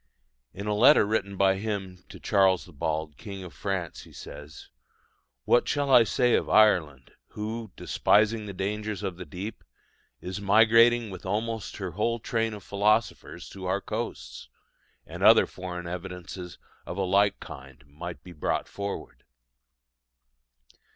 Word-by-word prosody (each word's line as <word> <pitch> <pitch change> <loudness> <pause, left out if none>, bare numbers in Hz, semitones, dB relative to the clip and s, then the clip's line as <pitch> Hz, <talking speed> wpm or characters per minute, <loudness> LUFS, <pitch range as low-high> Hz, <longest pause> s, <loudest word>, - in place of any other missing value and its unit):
In 100 - -7
a 105 - 0
letter 115 +3 +6
written 100 -2 -1
by 95 0 +3
him 95 -4 -5
to - - -11
Charles 95 -3 +3
the 90 - -16
Bald, 75 +1 -3
king 100 -3 -8
of 90 - -10
France, 95 -4 -4
he - - -15
says: 75 +1 -11 0.8
"What 120 - +3
shall 145 -1 0
I 120 -3 +7
say 125 +1 +2
of - - +1
Ireland, 80 - +3 0.2
who, 110 0 -5
despising 110 +1 +2
the 100 - -6
dangers 105 +1 -3
of 90 -2 -3
the 90 - -7
deep, 95 +8 -7 0.6
is 95 +3 -6
migrating 115 +2 +5
with 95 -1 -9
almost 110 +2 -3
her 95 -3 -4
whole 110 +6 0
train 115 -1 -2
of 100 - -11
philosophers 100 -5 0
to 95 -2 -7
our 95 +2 +1
coasts?" 105 - -6 0.6
And - - -9
other - - +7
foreign 90 -1 -7
evidences 90 0 -7 0.3
of 90 - -7
a 100 - 0
like 100 +2 +2
kind 70 -2 -11
might 80 +5 -8
be 90 - -11
brought 75 - -2
forward. 100 0 -6
100 Hz, 150 wpm, -27 LUFS, 90-110 Hz, 0.8 s, I